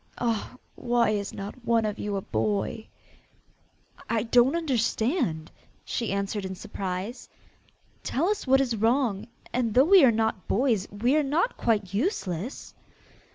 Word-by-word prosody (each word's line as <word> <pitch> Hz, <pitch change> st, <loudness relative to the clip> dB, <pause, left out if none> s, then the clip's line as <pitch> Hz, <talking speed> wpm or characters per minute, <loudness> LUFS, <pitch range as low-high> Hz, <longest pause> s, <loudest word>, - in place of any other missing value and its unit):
Ah! 230 Hz, 0 st, -2 dB, 0.2 s
why 240 Hz, -2 st, +1 dB
is 200 Hz, -2 st, -2 dB
not 205 Hz, +5 st, -8 dB
one 230 Hz, -1 st, +2 dB
of 210 Hz, -1 st, -3 dB
you 205 Hz, -1 st, -3 dB
a 195 Hz, -, -2 dB
boy!' 210 Hz, +1 st, -2 dB, 1.2 s
'I 225 Hz, -2 st, +1 dB
don't 245 Hz, +4 st, +4 dB
understand,' 240 Hz, -, 0 dB, 0.3 s
she 230 Hz, -5 st, -2 dB
answered 200 Hz, +1 st, -2 dB
in 190 Hz, 0 st, -5 dB
surprise. 190 Hz, +5 st, -5 dB, 0.7 s
'Tell 310 Hz, +7 st, -1 dB
us 415 Hz, -7 st, -1 dB
what 270 Hz, +1 st, +5 dB
is 245 Hz, -4 st, 0 dB
wrong: 225 Hz, -2 st, +1 dB, 0.3 s
and 235 Hz, -3 st, 0 dB
though 260 Hz, +2 st, +6 dB
we 380 Hz, -1 st, +7 dB
are 260 Hz, -, +8 dB
not 220 Hz, -3 st, -1 dB
boys, 220 Hz, -4 st, +1 dB
we 235 Hz, +7 st, +1 dB
are -, -, +4 dB
not 310 Hz, -, 0 dB
quite 205 Hz, -5 st, 0 dB
useless! 210 Hz, -, -3 dB
230 Hz, 145 wpm, -26 LUFS, 205-260 Hz, 1.2 s, are